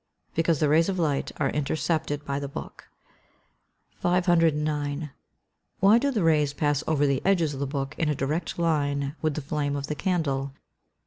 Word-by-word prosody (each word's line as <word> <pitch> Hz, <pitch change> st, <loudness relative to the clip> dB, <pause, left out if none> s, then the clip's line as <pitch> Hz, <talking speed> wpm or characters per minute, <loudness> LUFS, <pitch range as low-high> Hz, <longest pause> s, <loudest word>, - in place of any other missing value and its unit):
_ -, -, -41 dB
Because 165 Hz, -2 st, +2 dB
the 150 Hz, -, +3 dB
rays 160 Hz, +5 st, +4 dB
of 190 Hz, -, -1 dB
light 150 Hz, -5 st, 0 dB
are 135 Hz, -3 st, 0 dB
intercepted 150 Hz, 0 st, -1 dB
by 140 Hz, 0 st, -2 dB
the 140 Hz, -, -4 dB
book. 140 Hz, -, -9 dB, 1.1 s
509. 155 Hz, -5 st, +1 dB, 0.7 s
_Why 205 Hz, +4 st, +6 dB
do 280 Hz, +3 st, +1 dB
the 220 Hz, -9 st, 0 dB
rays 150 Hz, -3 st, +3 dB
pass 145 Hz, -1 st, 0 dB
over 145 Hz, -2 st, +2 dB
the 140 Hz, -2 st, +1 dB
edges 170 Hz, -6 st, +2 dB
of 135 Hz, -, -6 dB
the 140 Hz, -, -1 dB
book 135 Hz, 0 st, -3 dB
in 160 Hz, -, +1 dB
a 150 Hz, -, +1 dB
direct 150 Hz, +5 st, -2 dB
line 145 Hz, -4 st, 0 dB
with 155 Hz, -2 st, 0 dB
the 155 Hz, -, -3 dB
flame 145 Hz, -1 st, -1 dB
of 140 Hz, -1 st, -3 dB
the 150 Hz, -, -3 dB
candle? 140 Hz, -5 st, -1 dB
150 Hz, 180 wpm, -26 LUFS, 140-165 Hz, 1.1 s, Why